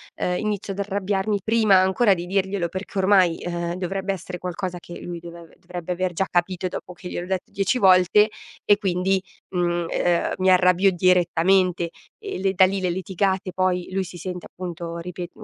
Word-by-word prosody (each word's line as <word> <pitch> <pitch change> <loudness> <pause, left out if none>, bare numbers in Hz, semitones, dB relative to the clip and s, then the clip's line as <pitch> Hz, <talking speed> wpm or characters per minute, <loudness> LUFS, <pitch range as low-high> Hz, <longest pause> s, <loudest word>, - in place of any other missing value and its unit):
ehm, 180 0 -1
inizio 210 -2 -2
ad 195 - -6
arrabbiarmi 200 +1 -1
prima 220 -3 +4
ancora 190 +3 +3
di 175 -1 -4
dirglielo 190 -1 -1
perché 190 +2 -6
ormai, 190 -3 +4
ehm, 170 0 -3
dovrebbe 190 +2 -2
essere 180 -1 -7
qualcosa 180 +1 -4
che 175 - -10
lui 175 -1 -6
deve 170 -1 -11
dovrebbe 180 0 -6
aver 180 0 -1
già 190 +3 0
capito 180 +1 0
dopo 180 - -7
che 180 0 -9
gliel'ho 175 - -5
detto 190 -1 -3
dieci 200 +6 0
volte 190 +1 +5 0.3
e 205 - +4
quindi, 190 -1 0 0.3
mhmm, 175 -2 0
ehm, 175 -1 +1
mi 185 0 +2
arrabbio 185 +1 +5
direttamente 180 0 +2 0.3
e 410 -2 -5
le 195 0 +1
da 190 - +5
lì 195 +1 -1
le 185 - 0
litigate 190 +1 -1
poi 185 -1 0
lui 190 0 -1
si 175 - -11
sente 180 0 -6
appunto 170 -2 -6
ripeto 180 +4 -8
185 Hz, 180 wpm, -23 LUFS, 175-195 Hz, 0.3 s, volte